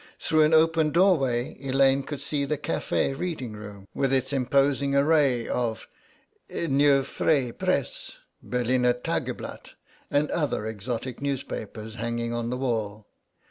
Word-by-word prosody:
Through 155 -1 +2
an 155 - +2
open 160 -1 +4
doorway 145 -9 +2
Elaine 135 0 +3
could 140 0 -6
see 140 0 -1
the 150 +2 -1
café 145 -2 -1
reading 150 -7 -4
room, 100 -2 -10
with 135 -1 0
its 135 +1 0
imposing 140 +1 +2
array 140 -5 +3
of 115 -2 -2 0.6
Neue 140 -3 +3
Freie 135 -3 +1
Presse, - - -2 0.3
Berliner 125 0 +1
Tageblatt, 125 - -4 0.3
and 145 +1 +1
other 145 -9 -1
exotic 115 +4 -4
newspapers 110 -5 -4
hanging 115 0 -2
on 120 0 -2
the 125 - -2
wall. 110 -5 -2
135 Hz, 130 wpm, -26 LUFS, 120-145 Hz, 0.6 s, open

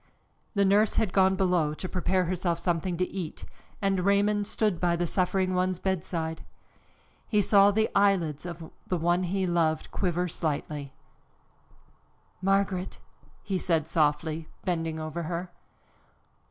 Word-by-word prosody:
The 200 0 +4
nurse 205 +2 +3
had 210 -5 +1
gone 190 0 +4
below 180 -5 +1
to 185 - -5
prepare 185 0 0
herself 175 -1 -1
something 175 0 -1
to 180 +1 0
eat, 180 -5 -6 0.4
and 195 -1 +2
Raymond 200 +2 +2
stood 210 -6 0
by 175 0 +2
the 175 +1 0
suffering 185 +1 0
one's 185 0 +1
bedside. 165 -3 -2 0.8
He 210 - +2
saw 200 0 +6
the 220 +2 +2
eyelids 190 -7 +2
of 170 -2 -8 0.2
the 180 - 0
one 175 +2 +2
he 190 +1 -1
loved 165 -3 0
quiver 180 -1 0
slightly. 150 -3 -3 1.5
"Margaret!" 195 -1 0 0.4
he 195 -3 -1
said 165 -4 0
softly, 155 0 0 0.2
bending 165 -3 -1
over 155 +2 -4
her. 175 +2 -4
180 Hz, 135 wpm, -28 LUFS, 165-195 Hz, 1.5 s, saw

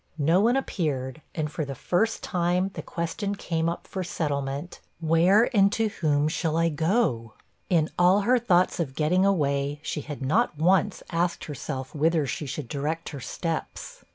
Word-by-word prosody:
No 165 +5 +3
one 235 +4 +3
appeared, 145 - -2
and, 150 -2 -2
for 155 - -3
the 135 -1 -5
first 215 - 0
time, 180 +2 0
the - - -5
question 185 +5 -3
came 165 -3 -1
up 170 - -5
for 190 - -4
settlement, 145 -1 -3 0.2
'Where, 170 +7 +4
and 200 -1 +5
to 225 -1 +1
whom, 150 -7 +1
shall 160 0 -1
I 165 0 +3
go?' 160 - 0 0.4
In 165 -4 +3
all 180 +3 +5
her 250 +4 +3
thoughts 185 -7 +2
of 135 -6 -2
getting 180 +6 +2
away, 145 -5 0
she 150 - -3
had 145 -2 -7
not 175 - +1
once 185 +5 +2
asked 170 +1 0
herself 135 -2 -5
whither 155 0 +2
she 140 +3 -4
should 135 0 -5
direct 150 +5 -3
her 145 - -7
steps. 165 - -5
165 Hz, 170 wpm, -26 LUFS, 145-185 Hz, 0.4 s, and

